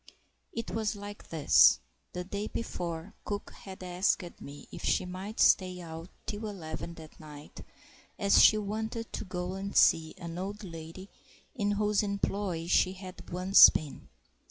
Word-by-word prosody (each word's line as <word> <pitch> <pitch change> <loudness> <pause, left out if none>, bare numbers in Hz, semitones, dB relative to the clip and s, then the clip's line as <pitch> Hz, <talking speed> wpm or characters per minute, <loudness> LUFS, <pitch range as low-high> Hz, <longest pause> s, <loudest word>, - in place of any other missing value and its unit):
It 230 - -5
was 220 -1 -1
like 205 0 -10
this: 155 - +6 0.3
the 180 - -4
day 200 +3 -4
before, 170 -4 -5
cook 205 0 -5
had 190 -1 -11
asked 180 0 -1
me 145 +1 -10
if - - -9
she - - +1
might 190 +4 -7
stay 185 -1 +4
out 165 0 -8 0.2
till 215 0 -4
eleven 170 -3 -6
that 160 -1 -13
night, 150 -1 -11 0.6
as 200 0 +5
she 215 - +7
wanted 220 +2 -4
to - - -3
go 180 -1 -4
and 195 +1 -4
see 160 -1 +4
an 170 0 -7
old 205 +3 -5
lady 165 +1 -9 0.5
in 205 -6 0
whose 210 0 +1
employ 200 -4 -2
she 185 +1 +3
had 185 -1 -11
once 185 +2 +8
been. 150 -3 -5
185 Hz, 155 wpm, -30 LUFS, 170-205 Hz, 0.6 s, once